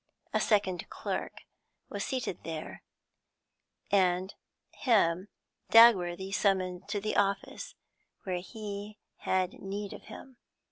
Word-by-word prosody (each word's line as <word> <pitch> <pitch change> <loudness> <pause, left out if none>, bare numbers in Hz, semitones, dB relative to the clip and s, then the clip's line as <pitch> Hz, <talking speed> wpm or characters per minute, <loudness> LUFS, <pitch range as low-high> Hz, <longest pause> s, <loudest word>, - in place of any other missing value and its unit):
A - - +3
second 200 -4 +1
clerk - - -4 0.5
was 200 -1 -4
seated 250 -8 -3
there, 160 -1 -6 1.1
and 185 -1 +2 0.4
him 190 -7 +2 0.4
Dagworthy 190 -5 +6
summoned 185 -3 +1
to 205 - -1
the 215 +2 -2
office, 200 -1 -1 0.5
where 185 -2 -2
he 205 +2 -7 0.2
had 185 -1 0
need 200 +1 -4
of - - -11
him. 250 +4 -11
195 Hz, 105 wpm, -30 LUFS, 185-210 Hz, 1.1 s, Dagworthy